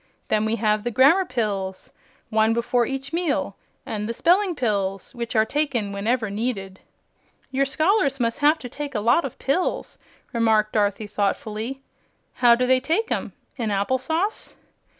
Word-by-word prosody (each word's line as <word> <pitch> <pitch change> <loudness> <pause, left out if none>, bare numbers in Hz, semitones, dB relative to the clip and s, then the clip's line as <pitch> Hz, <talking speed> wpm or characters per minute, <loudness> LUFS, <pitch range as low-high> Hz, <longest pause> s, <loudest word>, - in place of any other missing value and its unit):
Then 215 0 +2
we 220 +1 +1
have 215 -2 +1
the 240 - -1
Grammar 280 - +5
Pills 200 - -3 0.4
one 220 +1 +3
before 235 0 +1
each 270 +2 -5
meal 335 -3 -1 0.3
and 210 0 -4
the 230 - -3
Spelling 365 - +3
Pills, 200 -6 -2
which 235 -2 -5
are 220 0 +4
taken 255 -6 -1
whenever 215 +2 -1
needed." 200 -3 -3 0.7
"Your 275 +1 +2
scholars 305 -1 +1
must 230 -1 0
have 300 +2 +4
to 255 - -8
take 280 +2 -6
a - - +1
lot 240 +9 +3
of 265 - -6
pills," 305 +7 -1 0.3
remarked 220 -2 +2
Dorothy, 210 0 +1
thoughtfully. 215 +5 -2 0.5
"How 240 -2 +5
do 250 +1 0
they 260 0 +4
take 330 - -1
'em, - - -2 0.2
in 230 -4 -2
applesauce?" 260 - -1
235 Hz, 155 wpm, -23 LUFS, 215-275 Hz, 0.7 s, Grammar